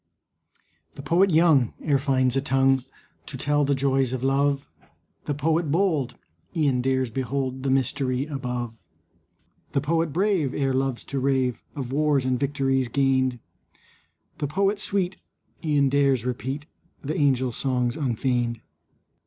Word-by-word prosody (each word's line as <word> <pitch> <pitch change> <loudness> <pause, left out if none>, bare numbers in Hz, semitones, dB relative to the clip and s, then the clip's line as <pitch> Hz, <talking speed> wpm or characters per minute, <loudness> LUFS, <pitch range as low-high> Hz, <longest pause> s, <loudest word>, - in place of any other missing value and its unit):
The 140 - -8
poet 175 +7 +3
young 155 -7 +4
e'er 145 -3 +1
finds 130 -2 +1
a 135 - +2
tongue 135 -1 +2 0.4
To - - -6
tell 145 0 +1
the 140 0 +2
joys 135 -1 +1
of 130 -1 -3
love. 140 +1 +1 0.6
The 145 - -2
poet 160 +2 0
bold 160 -6 +1 0.4
e'en 140 -5 +2
dares 130 -1 0
behold 130 +1 -2
The 135 - -1
mystery 130 0 0
above. 125 -5 -5 0.9
The - - +2
poet 165 +2 0
brave 180 -5 +1
e'er 135 -2 0
loves 130 -2 -1
to 140 - -4
rave 130 -2 0
Of 130 -4 -5
wars 145 -2 +2
and 130 -1 0
victories 135 -2 0
gained. 130 0 +1 1.0
The 145 - -1
poet 195 +6 +1
sweet 190 -3 -1 0.5
e'en 145 -3 +2
dares 135 -3 +2
repeat 130 +4 -3 0.4
The 150 +2 -3
angels' 130 -4 +1
songs 125 -2 0
unfeigned. 120 -4 -1
135 Hz, 135 wpm, -25 LUFS, 130-145 Hz, 1.0 s, young